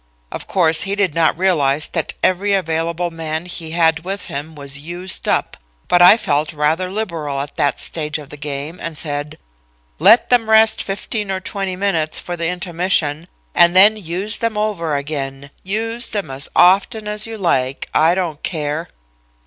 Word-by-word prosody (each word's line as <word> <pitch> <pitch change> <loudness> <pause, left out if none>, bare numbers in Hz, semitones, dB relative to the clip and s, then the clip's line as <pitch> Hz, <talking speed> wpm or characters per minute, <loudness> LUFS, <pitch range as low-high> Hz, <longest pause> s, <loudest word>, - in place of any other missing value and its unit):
Of - - -7
course, 165 -1 +3
I 200 - -1
did 200 -6 0
not 165 -1 +2
realize 155 -6 +1
that 165 -3 -3
every 195 +2 +2
available 170 -1 -1
man 160 0 -4
he 170 -2 -4
had 165 -1 +2
with 195 +2 -4
him 150 +3 -6
was 140 -1 -6
used 175 +4 -3
up, - - 0 0.3
but 175 - +3
I 180 +5 +9
felt 150 -6 -1
rather 155 +5 0
liberal 170 -9 -3
at 145 +1 -5
that 140 -2 +1
stage 150 -1 -2
of 145 -2 -11
the - - -7
game 150 +3 -6
and 165 -2 -4
said: 145 -1 -3 0.6
"'Let 210 +11 +5
them 230 -3 +3
rest 220 0 +5
fifteen 205 +1 -4
or 190 -1 -1
twenty 195 -1 -4
minutes 180 -5 0
for 175 - -4
the 165 -1 -2
intermission, 175 -3 -1 0.3
and 175 0 +5
then 205 +3 +7
use 195 +2 -3
them 230 -2 -1
over 190 -8 -1
again; 140 -1 -5
use 225 +5 -3
them 200 -9 -4
as 135 +2 -6
often 200 +4 +4
as 210 +1 -3
you 225 -1 -7
like. 135 -9 0
I 165 +3 +4
don't 170 -5 -3
care.' 155 0 -3
170 Hz, 175 wpm, -18 LUFS, 150-195 Hz, 0.6 s, I